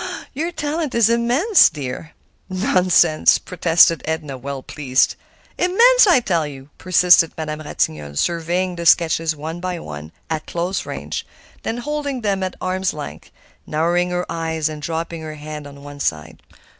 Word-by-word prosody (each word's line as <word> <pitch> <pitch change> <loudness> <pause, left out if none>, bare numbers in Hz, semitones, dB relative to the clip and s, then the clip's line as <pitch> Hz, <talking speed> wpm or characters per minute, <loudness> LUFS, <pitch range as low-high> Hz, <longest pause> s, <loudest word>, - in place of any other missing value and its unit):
"Your 325 +5 -2
talent 300 -3 -3
is 230 -1 +4
immense, 250 - +4
dear!" 145 +2 -7 0.4
"Nonsense!" 185 -4 +3
protested 165 -2 +3
Edna, 160 -3 -3
well 135 +1 -6
pleased. 130 -3 +1 0.4
"Immense, 465 +7 +5
I 350 -8 +6
tell 170 -8 0
you," 135 0 -11
persisted 180 -2 +4
Madame 155 -1 -4
Ratignolle, 75 - -3
surveying 175 - -1
the 170 0 -2
sketches 165 -2 +3
one 160 +3 -6
by 180 0 -3
one, 75 - -8 0.2
at 155 -1 -4
close 175 +3 -3
range, - - -5 0.4
then 225 - -3
holding 285 0 -3
them 200 -3 -1
at 185 -1 -3
arm's 185 -1 -1
length, 150 -1 -8 0.4
narrowing 170 +3 +1
her 180 0 -2
eyes, 160 -2 -2
and 155 -1 -7
dropping 165 +1 -4
her 155 -1 -7
head 150 -1 -8
on 140 0 -13
one 145 0 -10
side. 80 - -3
165 Hz, 150 wpm, -20 LUFS, 150-190 Hz, 0.4 s, I